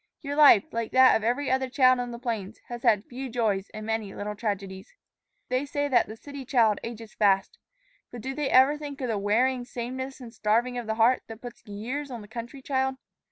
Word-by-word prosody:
Your 285 0 -3
life, 290 -9 +8
like 230 -1 -3
that 260 0 +7
of 220 - 0
every 250 +4 0
other 260 0 +1
child 255 0 +4
on 245 0 -3
the 235 - -6
plains, 225 -4 -4
has 240 -1 -6
had 210 -3 +3
few 260 +2 -6
joys 215 -5 -1
and 215 0 -7
many 220 -3 -3
little 210 +1 -4
tragedies. 200 - -5 0.5
They 255 +2 +1
say 285 0 -2
the 240 -5 +1
city 280 +2 -9
child 230 -5 +3
ages 230 -1 -8
fast; 195 -2 +2 0.5
but 240 - -9
do 265 +3 -4
they 290 0 -2
ever 270 +4 +5
think 285 -2 -7
of 250 - -2
the 215 -3 0
wearing 245 +5 +1
sameness 260 +3 -6
and 235 -3 -10
starving 230 +3 +1
of 240 -3 -5
heart 225 +3 +3
that 225 -1 -9
puts 245 -1 -10
years 245 +8 -5
on 240 -3 -6
the - - -13
country 235 +4 -8
child? 265 -1 0
240 Hz, 205 wpm, -27 LUFS, 220-260 Hz, 0.5 s, life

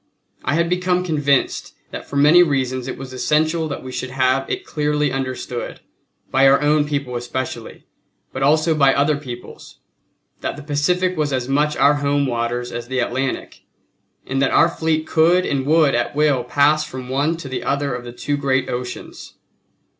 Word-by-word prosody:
I 145 - 0
had 170 +1 +2
become 180 +1 0
convinced 145 -5 0 0.2
that - - -7
for - - -7
many 150 +5 +6
reasons 130 -5 0
it 130 - -5
was 130 -1 -8
essential 155 +4 +1
that 145 - -6
we 130 - -7
should 130 0 -4
have 130 +1 +1
it - - -3
clearly 150 -1 0
understood, 130 -2 -4 0.5
by 135 +1 +5
our 135 +1 +5
own 150 0 +2
people 140 -4 -3
especially, 120 +2 -5 0.5
but 130 - -5
also 155 +4 +3
by 140 -3 +4
other 145 +2 +2
peoples, 125 -4 -9 0.6
that - - -3
the 145 - -9
Pacific 180 +6 0
was 150 -3 -1
as 130 -2 -1
much 150 +2 +1
our 140 +2 +5
home 145 0 +1
waters 120 0 -2
as 120 0 -6
the 130 +1 -3
Atlantic, 130 +2 -2 0.6
and 135 +1 -1
that 135 - +3
our 165 - +4
fleet 160 -1 -1
could 175 +3 +3
and 135 -1 -1
would 155 -2 +4
at 120 +3 -1
will 145 -4 +2
pass 150 +2 +3
from 130 -4 -8
one 145 +5 0
to 165 - -8
the 130 - -4
other 140 -1 -1
of 125 0 -5
the 120 - -8
two 145 +4 -3
great 130 -2 0
oceans. 125 0 -7
140 Hz, 180 wpm, -20 LUFS, 130-155 Hz, 0.6 s, many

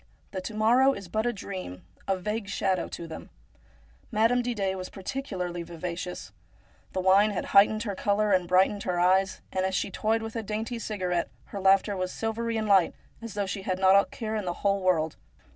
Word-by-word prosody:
The 190 - -4
to 215 +3 -6
morrow 245 +5 +4
is 195 -6 -8
but 220 +6 -1
a - - +2
dream, 185 - -7 0.2
a 195 - +1
vague 210 +2 -3
shadow, 190 -2 0
to 170 - -7
them. 160 - -9 0.8
Madame 230 +3 +3
Didet 210 -6 -1
was 185 -1 -6
particularly 190 -6 -4
vivacious. 175 +1 -6 0.6
The 185 - -1
wine 195 +3 +5
had 205 - -3
heightened 215 +2 +6
her 205 -3 -3
colour 205 +2 +1
and 185 -2 +3
brightened 190 +3 +3
her 180 -3 -1
eyes, 190 +2 +3
and 185 - -1
as 190 0 0
she - - -1
toyed 220 +3 0
with 225 +1 -6
a 225 - -1
dainty 220 +3 -4
cigarette, 180 -6 -2 0.2
her 200 - -3
laughter 195 +1 +4
was 185 -1 -2
silvery 225 +1 -2
and 215 -1 -1
light, 195 -4 +4 0.3
as 230 -3 -7
though 205 -1 0
she 195 +1 -4
had 185 -1 -2
not 190 0 +5
a 200 - +6
care 220 -1 -5
in 210 -3 -2
the 175 - -1
whole 200 0 +3
world. 160 -4 +1
195 Hz, 200 wpm, -27 LUFS, 185-215 Hz, 0.8 s, heightened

